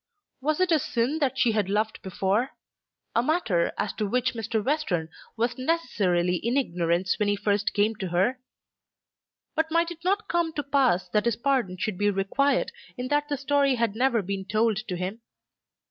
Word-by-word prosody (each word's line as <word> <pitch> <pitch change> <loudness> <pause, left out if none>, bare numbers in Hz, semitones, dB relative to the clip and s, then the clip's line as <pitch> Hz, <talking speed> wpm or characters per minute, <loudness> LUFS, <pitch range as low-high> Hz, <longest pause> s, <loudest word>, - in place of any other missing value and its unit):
Was 305 +4 0
it 370 -1 +2
a 320 - +5
sin 255 +4 -1
that 265 -3 0
she 250 -3 +3
had 210 -3 0
loved 215 +2 0
before, 195 +6 -1 0.6
a 235 - +4
matter 240 - +1
as 210 - -1
to 210 - -2
which 250 +4 +1
Mr. 220 -1 -2
Western 205 - 0 0.3
was 235 +3 -1
necessarily 195 - +1
in 235 +8 -1
ignorance 175 -6 0
when 210 - +2
he 205 - +2
first 205 0 0
came 210 +2 +3
to 190 - -3
her? 190 +9 +1 1.2
But 320 0 +1
might 335 +1 +1
it 340 0 -10
not 400 +3 0
come 340 -3 0
to 290 - -2
pass 270 -10 +2
that 210 0 +1
his 235 -2 +2
pardon 240 -8 0
should 185 0 -3
be 205 0 +3
required 230 +8 +1 0.3
in 250 0 -4
that 295 0 +1
the 290 - -1
story 275 0 +2
had 230 -3 0
never 240 -3 +2
been 195 +1 -3
told 220 0 +1
to 180 -4 -3
him? 190 +6 -4
230 Hz, 185 wpm, -26 LUFS, 200-280 Hz, 1.2 s, a